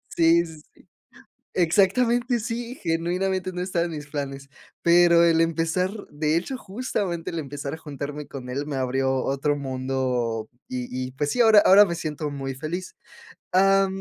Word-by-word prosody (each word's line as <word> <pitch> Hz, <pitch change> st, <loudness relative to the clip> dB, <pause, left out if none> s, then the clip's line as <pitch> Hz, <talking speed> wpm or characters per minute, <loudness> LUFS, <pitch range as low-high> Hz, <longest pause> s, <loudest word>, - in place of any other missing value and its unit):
sí, 170 Hz, +1 st, +4 dB
sí, 160 Hz, -2 st, -12 dB
sí, -, -, -23 dB, 0.7 s
exactamente, 235 Hz, +7 st, +2 dB
sí, 240 Hz, +2 st, -4 dB
genuinamente 180 Hz, +3 st, -1 dB
no 180 Hz, -, -5 dB
estaba 180 Hz, -2 st, 0 dB
en 170 Hz, -, -6 dB
mis 150 Hz, -1 st, -6 dB
planes, 140 Hz, -1 st, -5 dB, 0.3 s
pero 170 Hz, 0 st, +6 dB
el 165 Hz, -1 st, +4 dB
empezar 165 Hz, +3 st, +1 dB, 0.2 s
de 150 Hz, +1 st, 0 dB
hecho, 185 Hz, +10 st, -2 dB
justamente 195 Hz, -6 st, -3 dB
el 165 Hz, -, -4 dB
empezar 140 Hz, +1 st, -6 dB
a -, -, -8 dB
juntarme 145 Hz, -1 st, -6 dB
con 130 Hz, -2 st, -8 dB
él 140 Hz, +3 st, -3 dB
me 145 Hz, -2 st, -4 dB
abrió 130 Hz, +1 st, 0 dB
otro 140 Hz, +2 st, 0 dB
mundo, 130 Hz, -4 st, -2 dB, 0.2 s
y 125 Hz, -1 st, -4 dB, 0.2 s
y 130 Hz, -, -9 dB
pues 145 Hz, +2 st, -2 dB
sí, 245 Hz, -, -1 dB
ahora 220 Hz, -2 st, +7 dB
ahora 205 Hz, +1 st, +7 dB
me 170 Hz, -, -3 dB
siento 150 Hz, -2 st, -4 dB
muy 135 Hz, -2 st, -5 dB
feliz, 165 Hz, +7 st, -5 dB, 0.6 s
ah, 195 Hz, +1 st, +5 dB
165 Hz, 165 wpm, -24 LUFS, 140-185 Hz, 0.7 s, ahora